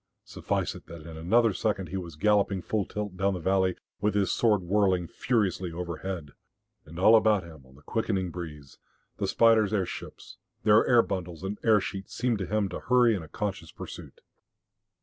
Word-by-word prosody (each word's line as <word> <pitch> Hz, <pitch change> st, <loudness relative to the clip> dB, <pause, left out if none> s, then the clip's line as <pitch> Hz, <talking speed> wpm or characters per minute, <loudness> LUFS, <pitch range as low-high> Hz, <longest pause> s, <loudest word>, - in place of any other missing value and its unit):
Suffice -, -, -2 dB
it -, -, -13 dB
that 85 Hz, -2 st, -10 dB
in 80 Hz, -1 st, -9 dB
another 110 Hz, +7 st, +3 dB
second 95 Hz, -2 st, -1 dB
he 95 Hz, -, -5 dB
was 85 Hz, -4 st, -5 dB
galloping 100 Hz, +1 st, +2 dB
full 105 Hz, -3 st, -1 dB
tilt 105 Hz, -3 st, -5 dB
down 95 Hz, +1 st, +1 dB
the -, -, -4 dB
valley 95 Hz, +1 st, +1 dB, 0.2 s
with 105 Hz, 0 st, 0 dB
his 100 Hz, -2 st, +2 dB
sword 105 Hz, -5 st, +2 dB
whirling 95 Hz, -1 st, +2 dB
furiously 95 Hz, -7 st, -1 dB
overhead. 85 Hz, -2 st, -5 dB, 0.6 s
And 80 Hz, +2 st, -11 dB
all 110 Hz, +5 st, +6 dB
about 110 Hz, -3 st, +4 dB
him 80 Hz, -6 st, -13 dB
on 65 Hz, -, -19 dB
the 75 Hz, -, -19 dB
quickening 95 Hz, -4 st, -1 dB
breeze, 75 Hz, -5 st, -9 dB, 0.4 s
the -, -, -1 dB
spiders' 110 Hz, -3 st, +4 dB
airships, 95 Hz, -3 st, -5 dB, 0.3 s
their 105 Hz, +1 st, +5 dB
air 120 Hz, -2 st, +6 dB
bundles 90 Hz, -3 st, -5 dB
and 100 Hz, +2 st, -4 dB
air 110 Hz, -2 st, +5 dB
sheets, 95 Hz, 0 st, -6 dB
seemed 120 Hz, -3 st, 0 dB
to 95 Hz, -, -3 dB
him 105 Hz, -1 st, 0 dB
to 90 Hz, -, -5 dB
hurry 125 Hz, -2 st, +4 dB
in 95 Hz, -, -4 dB
a 80 Hz, -, -10 dB
conscious 95 Hz, -1 st, -4 dB
pursuit. -, -, -10 dB
95 Hz, 185 wpm, -28 LUFS, 85-105 Hz, 0.6 s, all